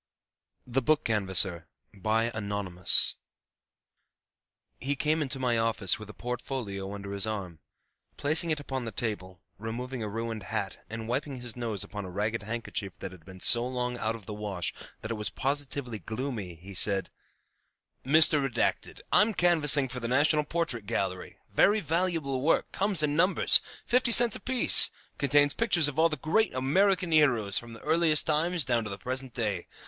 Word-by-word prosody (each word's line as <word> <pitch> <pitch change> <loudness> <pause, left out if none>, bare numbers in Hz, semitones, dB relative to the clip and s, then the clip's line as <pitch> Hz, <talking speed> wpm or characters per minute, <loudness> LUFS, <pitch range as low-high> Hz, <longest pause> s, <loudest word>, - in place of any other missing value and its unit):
] - - -54
THE 135 - +2
BOOK 155 +4 +1
CANVASSER 95 -5 0 0.4
ANONYMOUS 105 -5 0 1.6
He 140 +2 -2
came 155 +3 -1
into 140 -2 -3
my 125 -3 -1
office 110 -4 0
with 105 0 -11
a - - -10
portfolio 115 -5 -6
under 100 -1 -8
his 100 +1 -2
arm. 95 -7 -6 0.6
Placing 160 +3 +2
it 155 -2 -1
upon 135 -3 -6
the 115 - -6
table, 95 -7 -5 0.2
removing 120 +3 -6
a 105 - -4
ruined 115 +1 -5
hat, 100 +1 -5
and 110 0 -7
wiping 135 +2 -4
his 120 -2 -5
nose 115 -5 -4
upon 105 -2 -8
a - - -8
ragged 105 +5 -3
handkerchief 105 -3 -6
that 95 - -8
had 90 -3 -15
been 95 +1 -14
so 120 +5 +4
long 125 -1 -4
out 110 +1 -2
of 110 -4 -13
the 105 - -7
wash 105 -4 -4 0.3
that 110 - -6
it 110 -2 -5
was 105 - -1
positively 135 -4 -3
gloomy, 110 - -6
he 95 +5 -13
said, 95 0 +2 0.9
"Mr., 145 -2 +2
I'm 210 0 +3
canvassing 150 -6 +5
for 125 0 -7
the 115 - -5
National 150 +4 +2
Portrait 150 -9 -2
Gallery; 95 -5 -4 0.2
very 210 +2 +3
valuable 165 -6 -2
work; 155 +4 0
comes 195 -5 0
in 145 -1 -1
numbers, 180 +5 +4 0.2
fifty 250 0 +1
cents 235 -2 +8
apiece; 255 -2 +7 0.3
contains 145 0 +3
pictures 175 -9 +3
of 145 +1 -4
all 165 +1 +4
the 155 - -4
great 215 +6 0
American 180 +7 +1
heroes 120 -11 +2
from 120 -1 -12
the 115 - -13
earliest 160 -1 +3
times 160 +1 0
down 120 -2 0
to 105 - -7
the 100 - -7
present 130 +3 -4
day. 105 -7 -2
125 Hz, 165 wpm, -27 LUFS, 105-150 Hz, 1.6 s, cents